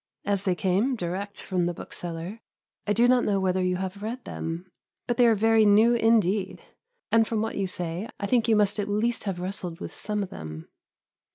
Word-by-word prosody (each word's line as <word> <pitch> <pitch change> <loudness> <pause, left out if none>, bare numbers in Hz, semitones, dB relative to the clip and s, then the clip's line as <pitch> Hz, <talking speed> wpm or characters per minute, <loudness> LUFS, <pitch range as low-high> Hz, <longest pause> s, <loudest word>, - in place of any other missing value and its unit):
As 200 -1 0
they 185 -2 +2
came 190 - +1
direct 200 +1 -4
from 180 -2 -1
the 175 - -3
bookseller, 175 +7 -6 0.5
I 205 - +3
do 235 +3 +4
not 250 0 +4
know 200 -2 +1
whether 185 -1 +1
you 180 0 +1
have 190 +2 -4
read 235 +4 -5
them, 170 +3 -5 0.3
but 240 -1 -1
they 245 - +6
are 225 - +5
very 225 +1 +4
new 215 +3 +6
indeed, 215 -4 +2 0.5
and, 225 -1 +4
from 225 - -1
what 220 +1 -2
you 195 -1 -1
say, 180 +3 -4
I 200 - -2
think 235 +2 +2
you 225 - +4
must 210 0 +2
at 205 0 -2
least 225 +3 0
have 190 -3 -2
wrestled 180 -2 -5
with - - -7
some 210 -1 -2
of 190 - -8
them. 80 0 -8
200 Hz, 205 wpm, -26 LUFS, 180-225 Hz, 0.5 s, they